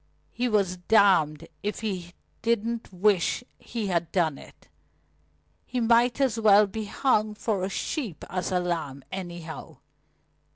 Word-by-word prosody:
He 245 +1 -1
was 195 -4 +1
damned 180 -6 +3
if 210 +1 -3
he 185 -5 -4 0.3
didn't 230 0 -1
wish 195 +3 +2 0.2
he 230 -3 -4
had 170 -4 -1
done 160 -6 +1
it. - - -16 1.0
He 250 - -3
might 235 +2 +3
as 255 -5 +1
well 210 -1 +6
be 215 +2 -5
hung 215 -1 +1
for 210 -3 -1
a 190 - -1
sheep 205 - -4
as 185 +1 -3
a 180 - +2
lamb, 160 -6 -3
anyhow. 175 -3 -7
200 Hz, 135 wpm, -27 LUFS, 175-225 Hz, 1.0 s, well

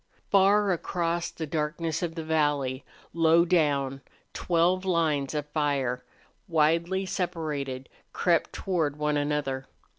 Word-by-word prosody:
Far 200 0 +4
across 170 -1 -1
the 160 - -6
darkness 155 +2 -2
of 170 -2 -3
the 165 - -4
valley, 145 -4 0 0.3
low 165 +1 +4
down, 140 -6 +1 0.3
twelve 175 +2 +1
lines 160 -6 0
of 150 -1 -2
fire, 140 -5 -1 0.4
widely 170 +3 +2
separated, 150 -8 -3 0.2
crept 170 -2 +1
toward 165 -7 -1
one 150 0 0
another. 145 -2 -1
160 Hz, 115 wpm, -27 LUFS, 145-170 Hz, 0.4 s, Far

